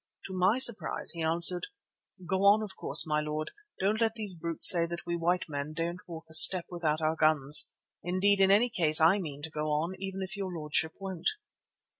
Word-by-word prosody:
To 190 - -10
my 185 +5 0
surprise, 240 -4 +1
he 170 - -8
answered: 170 +2 +2 0.6
"'Go 190 - -3
on, 205 +2 +3
of 200 -3 -10
course, - - +2
my 150 -1 -2
lord. 150 0 -6 0.3
Don't 210 +4 -2
let 225 0 -1
those 210 -4 -3
brutes 170 -1 +1
say 170 -2 +7
that 170 0 -9
we 170 - -4
white 175 +2 -2
men 145 0 -7
daren't 170 +3 -7
walk 165 -2 -11
a 160 - -17
step 175 +2 +7
without 160 -3 -4
our 155 +1 -2
guns. 150 -2 +4 0.3
Indeed, 195 +3 -1
in 190 - +3
any 220 +5 +2
case 160 -7 +1
I 165 +6 +2
mean 145 -5 -9
to 160 - -8
go 155 0 -6
on, 155 +4 -3
even 195 0 -7
if 190 +4 -8
your 195 -2 -7
lordship 155 +1 -4
won't. 190 -3 -5
170 Hz, 205 wpm, -27 LUFS, 155-190 Hz, 0.6 s, say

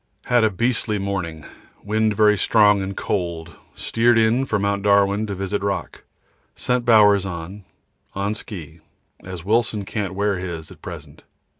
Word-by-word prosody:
Had 120 -2 +3
a 110 - +4
beastly 110 +1 -1
morning. 95 -6 -4 0.4
Wind 110 0 0
very 105 0 +5
strong 105 -1 +4
and 95 0 -5
cold. 85 -4 -3 0.2
Steered 115 +1 +2
in 115 +4 +3
for 110 - 0
Mt. 100 0 -1
Darwin 100 +1 +2
to 100 - -4
visit 95 +2 -3
rock. 100 -1 -4 0.5
Sent 125 -1 -1
Bowers 105 -4 +5
on, 95 +2 -7 0.5
on 100 +2 -1
ski, 85 -7 -9 0.4
as 90 -2 -8
Wilson 110 -1 0
can't 100 -2 -4
wear 100 -1 0
his 85 -4 -6
at - - -15
present. - - -10
100 Hz, 150 wpm, -22 LUFS, 95-110 Hz, 0.5 s, very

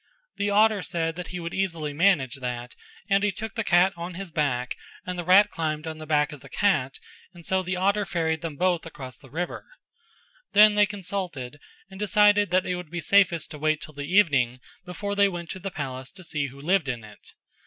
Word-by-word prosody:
The 200 0 0
otter 210 0 +4
said 165 -3 -2
that 180 0 -6
he 180 - -6
would 170 0 -5
easily 165 -6 -2
manage 150 -6 +2
that 125 -1 -5 0.3
and 195 -1 +3
he 205 - +2
took 220 +2 -6
the 225 - -2
cat 180 +1 +4
on 170 +1 -6
his 190 -1 -7
back 130 -6 -1 0.3
and 180 - -3
the 175 - -4
rat 185 +4 +6
climbed 155 -1 -2
on 160 -1 -5
to - - -13
the 155 - -7
back 150 -2 +2
of 150 - -9
the 135 - -13
cat 140 -8 +1 0.4
and 170 -1 -13
so 190 0 +1
the 185 0 -3
otter 200 +3 +2
ferried 165 -3 -1
them 165 -3 -5
both 180 +1 +1
across 130 -6 -9
the 135 - -16
river; 170 +6 -4 0.9
then 210 +1 +8
they 205 0 +4
consulted 180 -9 -5 0.3
and 190 - -10
decided 205 -1 +4
that 185 +1 +2
it 180 - -1
would 180 -3 -8
be 175 +2 -4
safest 170 -1 +3
to 150 - -8
wait 155 0 +1
till 150 +1 -10
the 145 +2 -6
evening 140 -11 +3 0.3
before 200 +3 -4
they 200 0 +4
went 175 -2 -6
to 185 - -6
the 195 - -4
palace 130 -6 -6
to 185 -1 -13
see 150 -4 -2
who 135 +1 -12
lived 165 0 +1
in 120 -3 -3
it. 105 -1 -15
170 Hz, 220 wpm, -26 LUFS, 150-195 Hz, 0.9 s, then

